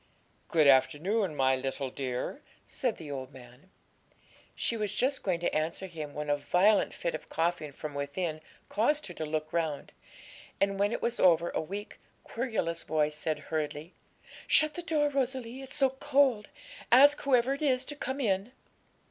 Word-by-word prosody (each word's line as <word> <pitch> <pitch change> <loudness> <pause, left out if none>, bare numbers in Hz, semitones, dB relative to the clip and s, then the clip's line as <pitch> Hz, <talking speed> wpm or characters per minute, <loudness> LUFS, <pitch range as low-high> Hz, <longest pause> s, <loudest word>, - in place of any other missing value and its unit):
'Good 160 -3 +3
afternoon, 155 +7 +3
my 130 -1 +3
little 135 0 -3
dear,' 125 -2 -4 0.3
said - - -1
the 150 -3 -8
old 130 -1 -5
man. 125 +5 -15 0.9
She 235 - -1
was 210 -3 -2
just 265 +4 +1
going 180 -4 0
to 175 - -1
answer 160 +5 -1
him 155 -5 -7
when 150 0 -4
a 145 - +3
violent 180 +9 +3
fit 170 - -3
of 155 - -7
coughing 165 -2 -1
from 150 +1 -7
within 155 +3 -3 0.3
caused 290 +8 +1
her 175 - -7
to 160 - -4
look 155 0 -3
round, 160 -4 -2 0.7
and 195 0 +1
when 205 +1 +2
it - - -3
was 235 0 -1
over 170 -2 +4
a - - -1
weak, 200 +6 -7 0.2
querulous 225 -9 -2
voice 150 -1 0
said 155 0 -1 0.2
hurriedly 155 +2 -3 0.5
'Shut 310 0 +4
the 350 - -5
door, 310 -4 +1
Rosalie; 260 -2 -2
it's 265 0 -9
so 270 -3 +3
cold; 265 -5 +2 0.4
ask 285 +4 +7
whoever 260 -1 +3
it 280 - -6
is 260 -3 +2
to 290 - -6
come 265 -1 -4
in.' 205 -1 0
180 Hz, 170 wpm, -30 LUFS, 150-255 Hz, 0.9 s, ask